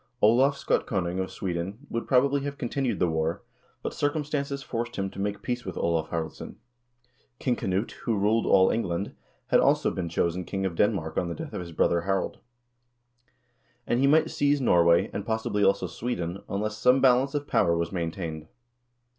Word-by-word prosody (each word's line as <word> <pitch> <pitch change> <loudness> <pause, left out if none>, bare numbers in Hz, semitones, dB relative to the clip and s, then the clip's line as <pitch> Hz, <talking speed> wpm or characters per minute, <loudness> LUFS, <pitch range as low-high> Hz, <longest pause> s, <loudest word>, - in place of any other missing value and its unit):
Olav 130 +6 +4
Skotkonung 95 -9 -1
of 95 - -3
Sweden 95 +6 -4
would, 115 - -3
probably, 140 +2 +3
have 140 0 -4
continued 130 +1 -1
the 90 - +2
war, 80 0 -1 0.4
but - - -3
circum 145 +1 0
stances 140 -2 -3
forced 120 -4 -4
him 95 -1 -2
to - - -10
make 100 0 -3
peace 120 -1 -2
with 95 - -6
Olav 80 -2 0
Haraldsson 80 -1 -5 0.8
King 125 -1 0
Knut, 95 +2 -1
who 115 -3 -2
ruled 105 +3 +2
all 95 -1 +5
England, 95 -3 -2 0.4
had - - +5
also - - +3
been 85 -2 -3
chosen 85 +2 0
king 95 +2 -3
of 95 - -1
Denmark 95 -6 +1
on 90 - -2
the 85 - -4
death - - -7
of - - -3
his 85 -1 -8
brother 85 +1 +2
Harald; 95 +2 -1 1.5
and 120 - +1
he 135 - +4
might 155 +3 +4
seize 145 0 +2
Norway 85 -8 +4
and, 100 - -3
possibly, 110 -1 -1
also 100 - +3
Sweden 95 -6 -4
unless 105 +2 -2
some 125 +3 +5
balance 135 +2 +4
of 145 0 -1
power 85 -11 +2
was 85 -1 -2
maintained. 80 -3 -4
100 Hz, 180 wpm, -27 LUFS, 85-125 Hz, 1.5 s, all